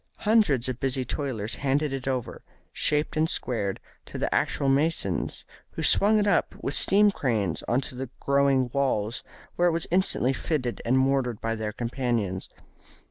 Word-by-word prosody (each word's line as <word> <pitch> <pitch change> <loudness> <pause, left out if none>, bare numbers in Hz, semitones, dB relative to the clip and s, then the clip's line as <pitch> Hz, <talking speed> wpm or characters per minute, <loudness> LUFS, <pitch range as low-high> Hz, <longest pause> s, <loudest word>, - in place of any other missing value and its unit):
Hundreds 210 - +3
of 130 -1 -4
busy 130 -1 -1
toilers 120 -5 -3
handed 140 +1 0
it 135 -1 -5
over, 130 -3 -3 0.3
shaped 150 0 +1
and 155 +1 +1
squared, 100 -6 -2 0.2
to - - -9
the - - -1
actual 140 - 0
masons, 145 +5 0 0.3
who - - -4
swung 210 +2 +5
it 210 - +2
up 200 -4 +1
with 140 - -3
steam 205 +5 +5
cranes 110 - -1
on 120 - +2
to 135 - -6
the 130 0 -6
growing 140 -2 +2
walls, 125 -4 -1 0.3
where 175 - +3
it - - +3
was 165 0 -1
instantly 175 -8 +2
fitted 130 -3 -3
and 125 +3 +2
mortared 130 -4 +1
by 115 0 -2
their 110 -1 -3
companions. 115 -5 -2
135 Hz, 165 wpm, -26 LUFS, 120-150 Hz, 0.3 s, swung